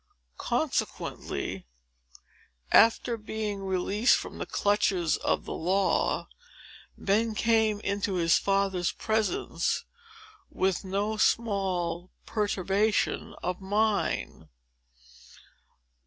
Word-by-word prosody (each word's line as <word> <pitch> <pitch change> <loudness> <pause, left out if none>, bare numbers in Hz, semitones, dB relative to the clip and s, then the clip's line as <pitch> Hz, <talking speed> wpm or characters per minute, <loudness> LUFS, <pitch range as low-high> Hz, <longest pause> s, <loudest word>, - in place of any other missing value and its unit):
Consequently, - - -2 1.0
after 230 +1 +5
being 215 -1 -4
released 195 +4 +2
from - - -7
the - - -4
clutches 200 -5 +1
of - - -1
the - - -5
law, 190 +4 +1 0.7
Ben 215 +3 +1
came 220 -1 +2
into 200 -1 -1
his 170 -2 +3
father's 195 -3 +1
presence, 220 - -1 0.6
with 190 0 0
no 200 +3 -1
small 185 -6 0 0.2
perturbation 205 0 0
of 180 +1 -2
mind. 210 +2 0
200 Hz, 80 wpm, -28 LUFS, 190-220 Hz, 1.0 s, after